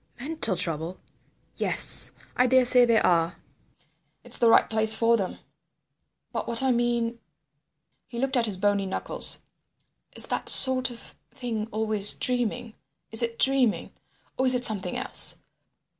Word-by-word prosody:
"Mental 275 -7 -2
trouble! 165 +1 0 0.6
Yes. - - +5 0.2
I 250 - 0
daresay 250 -1 +4
there 230 -2 0
are. 170 0 -1 0.9
It's - - -5
the 235 - +1
right - - +2
place 220 0 +2
for 230 +1 0
them. 195 -5 -6 0.9
But - - -7
what 235 +2 -1
I 265 - -1
mean—" 235 -1 -3 0.9
He 240 - -12
looked 270 +2 -4
at 235 -2 -1
his 200 -3 -3
bony 200 0 -3
knuckles. 190 - -3 0.7
"Is - - +2
that - - -5
sort 260 -1 +5
of 235 -1 -14
thing 225 -4 -8
always 215 -1 +2
dreaming? 245 -2 -3 0.4
Is 225 - +2
it 230 -1 -5
dreaming? 265 -5 -1 0.5
Or 260 - -1
is 255 - +5
it 250 0 0
something 210 -4 -4
else? - - +4
230 Hz, 145 wpm, -23 LUFS, 215-250 Hz, 0.9 s, Yes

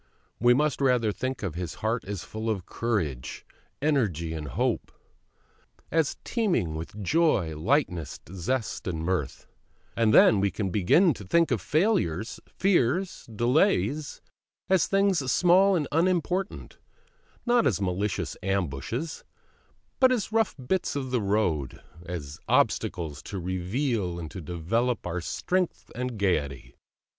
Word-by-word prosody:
We 120 +2 +5
must 150 +1 +1
rather 125 -5 +3
think 130 +3 -4
of 95 -6 -2
His 85 -1 -5
Heart 115 +2 -2
as 100 -2 -5
full 110 +1 -4
of 100 -5 -2
courage, 85 - -3 0.4
energy, 100 - +1
and 75 -2 -5
hope; 65 - -1 1.0
as 160 -2 +1
teeming 190 - 0
with 85 +6 -6
joy, 105 - +2
lightness, 90 - 0
zest, 110 +7 -2
mirth; 90 +1 -2 0.5
and 115 -2 +3
then 105 -1 +7
we 100 +1 +2
can 95 0 -3
begin 145 - +4
to 105 - -10
think 165 - +2
of 115 -6 +1
failures, 150 - 0
fears, 185 -1 0
delays 140 - +1 0.5
as 190 -2 +4
things 195 -9 +2
small 185 +2 +5
and 150 -5 0
unimportant, 180 +3 0 0.7
not 240 -1 +4
as 105 -9 +1
malicious 95 +1 -2
ambushes, 95 - -2 0.8
but 260 -1 +6
as 230 -4 -1
rough 225 -1 +1
bits 190 -2 0
of 130 -2 -3
road, 100 - 0 0.3
as 75 -5 -6
obstacles 75 -5 +1
to 100 - -6
reveal 95 - -1
and 80 -3 -6
to 95 - -7
develop 105 +10 -1
our 90 0 -2
strength 180 - -2
and 125 -1 -4
gaiety. 70 -10 -1
110 Hz, 130 wpm, -27 LUFS, -, 1.0 s, then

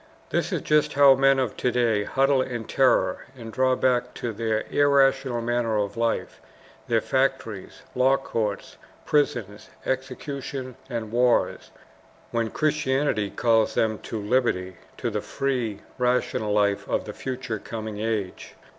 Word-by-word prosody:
This - - 0
is - - -1
just 150 -1 +2
how 140 -1 +7
men 135 +1 +4
of 130 -4 -1
to 125 - +1
day 115 -4 +1
huddle 135 0 +2
in 120 -3 -3
terror 135 -2 +2
and 115 -2 -9
draw 130 0 +2
back 125 -1 +1
to 120 -2 -4
their 110 0 -1
irrational 135 -3 +3
manner 120 -2 0
of 100 -1 -1
life, 115 0 -2 0.5
their 115 -2 +2
factories, 130 -7 -2
law 130 +2 +4
courts, 110 -6 -3 0.3
prisons, 115 -8 0 0.2
executions, 130 0 -4
and 115 -4 -4
wars, 120 +1 +2 0.6
when 115 -1 0
Christianity 140 -8 0
calls 115 0 +2
them 110 -1 +1
to 110 - -5
liberty, 100 -5 0 0.2
to - - -2
the - - -2
free, 125 -6 -2 0.2
rational 125 -4 +1
life 100 -1 +1
of - - 0
the - - -6
future 125 -4 -4
coming 110 -1 -6
age. 105 -4 -3
120 Hz, 140 wpm, -25 LUFS, 110-130 Hz, 0.6 s, how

